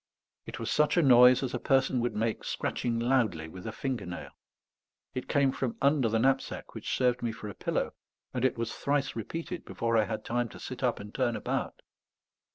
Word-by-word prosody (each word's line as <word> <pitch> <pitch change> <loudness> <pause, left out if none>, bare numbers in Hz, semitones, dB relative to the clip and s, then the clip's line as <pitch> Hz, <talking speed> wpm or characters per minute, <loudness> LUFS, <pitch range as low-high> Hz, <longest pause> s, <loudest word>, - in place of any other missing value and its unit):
It - - -6
was - - -3
such 150 +3 +3
a 170 - +5
noise 125 -1 +7
as 130 - -2
a 125 - -1
person 135 -1 +2
would 120 -2 -1
make 110 +1 -1
scratching 120 -1 -2
loudly 115 -10 +1
with 90 +5 -9
a - - -2
finger 120 -4 -3
nail; 90 - -7 0.8
it 130 - -4
came 140 -2 +3
from 130 -3 -3
under 140 -4 +3
the 115 - +1
knapsack 130 +4 0
which - - -3
served 125 -1 +2
me 120 - -1
for 105 -1 -7
a - - -6
pillow, - - -2 0.4
and 125 - -2
it 130 - +2
was 115 -1 -2
thrice 140 -1 0
repeated 165 - -5
before 115 0 -1
I 110 - +4
had 110 0 -4
time 120 0 0
to - - -11
sit - - -7
up - - +1
and 105 +1 -9
turn 120 -3 +1
about. - - -3
120 Hz, 205 wpm, -30 LUFS, 115-135 Hz, 0.8 s, noise